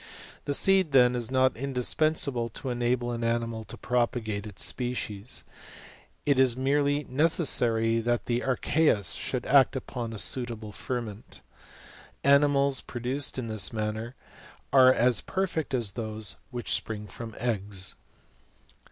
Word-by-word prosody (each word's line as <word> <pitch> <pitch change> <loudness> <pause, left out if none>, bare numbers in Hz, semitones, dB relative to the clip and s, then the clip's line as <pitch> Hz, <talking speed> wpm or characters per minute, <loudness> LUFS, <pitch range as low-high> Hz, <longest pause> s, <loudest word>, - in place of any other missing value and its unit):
The 145 - 0
seed, 190 -4 +4
then, 125 -2 +5
is 120 -2 -1
not 130 -1 +2
indispensable 135 0 -1
to 130 +4 -6
enable 120 0 -1
an 120 0 -4
animal 115 -1 -2
to 120 +3 -9
propagate 115 -4 -2
its 105 - -4
species; 120 -3 -1 0.8
it 140 -2 +2
is 130 -2 +3
merely 145 +2 +1
necessary 125 -6 +2
that 120 +1 -1
the 120 0 -1
archeus 130 - +1
should 125 - -3
act 135 0 +4
upon 120 -3 -5
a 110 - -7
suitable 115 -2 +1
ferment. 115 -1 -6 0.8
Animals 140 -1 +3
pro 120 - -8
duced 130 +4 0
in 130 - -3
this 110 -2 +1
manner 110 +2 -4 0.6
are 130 -1 +7
as 125 -1 +2
perfect 190 -5 -3
as 115 -5 -1
those 110 0 -3
which 120 -2 -3
spring 105 -2 -2
from 110 +3 -9
eggs. 100 -5 -2
120 Hz, 135 wpm, -27 LUFS, 115-135 Hz, 0.8 s, are